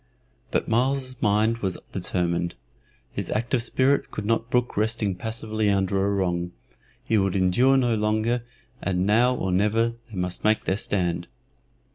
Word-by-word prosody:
But - - -1
Myles's 130 +2 0
mind 110 +2 +2
was 95 -5 -1
determined; 85 -2 -1 0.6
his - - -4
active 120 +3 0
spirit 130 +4 +1
could 105 - -5
not 115 +1 0
brook 125 0 +1
resting 110 -1 0
passively 110 +1 -2
under 95 -1 +1
a 100 - +1
wrong; 90 -3 -1 0.5
he 110 - +2
would 95 -1 0
endure 100 +9 +4
no 120 -3 +2
longer, 110 +3 +1 0.4
and 90 0 0
now 120 +5 +4
or 95 -6 -2
never 105 +5 +2 0.2
they 110 - -10
must 90 0 -2
make 110 0 +2
their 95 - +1
stand. 85 -5 -1
105 Hz, 150 wpm, -25 LUFS, 95-115 Hz, 0.6 s, endure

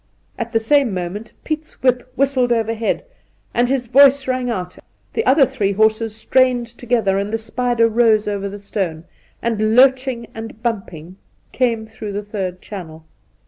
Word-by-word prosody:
At 235 -1 -5
the 225 - +2
same 240 -2 +2
moment 185 +5 -5
Piet's 310 0 -4
whip 255 0 +1
whistled 260 -2 +1
overhead, 225 - 0 0.5
and 240 +1 +2
his 265 -2 0
voice 275 +2 +5
rang 255 -1 -1
out; 185 -5 -4 0.3
the 450 - 0
other 275 +1 +6
three 230 -7 -1
horses 220 +1 +1
strained 255 +1 +2
together, 230 -4 0
and 200 +1 -3
the 225 - 0
spider 230 +1 +1
rose 225 -2 +3
over 200 -1 -2
the 200 - -7
stone, 190 -5 -4 0.4
and, 220 -1 +1
lurching 260 -2 +4
and 225 0 -8
bumping, 185 -7 -4 0.3
came 230 -3 0
through 220 -2 -7
the 205 +1 -3
third 190 -3 -5
channel. 160 -6 -9
225 Hz, 155 wpm, -19 LUFS, 205-250 Hz, 0.5 s, other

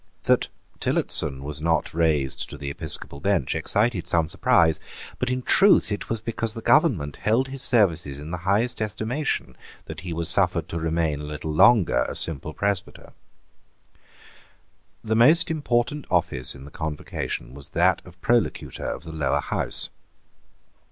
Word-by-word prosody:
That - - +3 0.3
Tillotson 65 -1 +1
was 75 +1 -6
not 80 +1 0
raised 80 -5 0
to 75 - -8
the 70 0 -5
episcopal 75 -1 -5
bench 95 -6 0
excited 100 +5 0
some 85 -2 +2
surprise. 80 0 +3 0.4
But 125 - -1
in 125 0 -2
truth 195 - +5
it 105 - -4
was 115 -1 -2
because 115 0 -3
the 115 - -7
government 70 0 +3
held 120 +5 +1
his 135 -1 -7
services 85 - +2
in 75 +3 -8
the 90 - -2
highest 110 +4 +1
estimation 110 - -2 0.3
that - - -8
he 90 -1 -6
was 85 0 -2
suffered - - +2
to 85 - -3
remain 80 -2 0
a - - -7
little 75 +1 -5
longer 85 - +5
a - - -5
simple 75 -1 -3
presbyter. 100 +2 -3 1.9
The 110 0 0
most 155 +9 +5
important 145 -1 -1
office 75 -9 0
in 70 0 -11
the 75 - -12
Convocation 75 -6 -5
was 70 0 -11
that 90 +2 +2
of 90 0 -16
Prolocutor 120 -2 0
of - - -7
the 80 -1 -8
Lower 75 -4 0
House. - - -1
85 Hz, 155 wpm, -24 LUFS, 75-115 Hz, 1.9 s, truth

